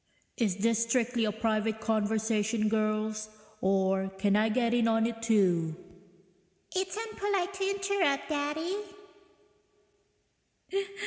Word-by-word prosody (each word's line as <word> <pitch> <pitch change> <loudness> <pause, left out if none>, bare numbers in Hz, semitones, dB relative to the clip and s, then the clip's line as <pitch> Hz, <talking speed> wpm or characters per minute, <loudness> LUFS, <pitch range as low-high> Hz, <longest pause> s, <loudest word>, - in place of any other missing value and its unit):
(Is 205 -6 0
this 230 +2 +2
strictly 230 0 +1
a 210 - +1
private 220 0 0
conversation, 220 0 +1
girls, 215 0 -1 0.3
or 190 0 +2
can 200 +1 +2
I 215 +1 +3
get 235 +1 +1
in 235 -1 +3
on 225 0 +3
it, 230 -1 -3
too?) 180 -8 +2 1.0
(It's 375 +2 -1
unpolite 405 -4 -2
to 385 0 -1
interrupt, 390 -7 0
Daddy.) 310 +5 -1
225 Hz, 110 wpm, -30 LUFS, 215-285 Hz, 1.0 s, I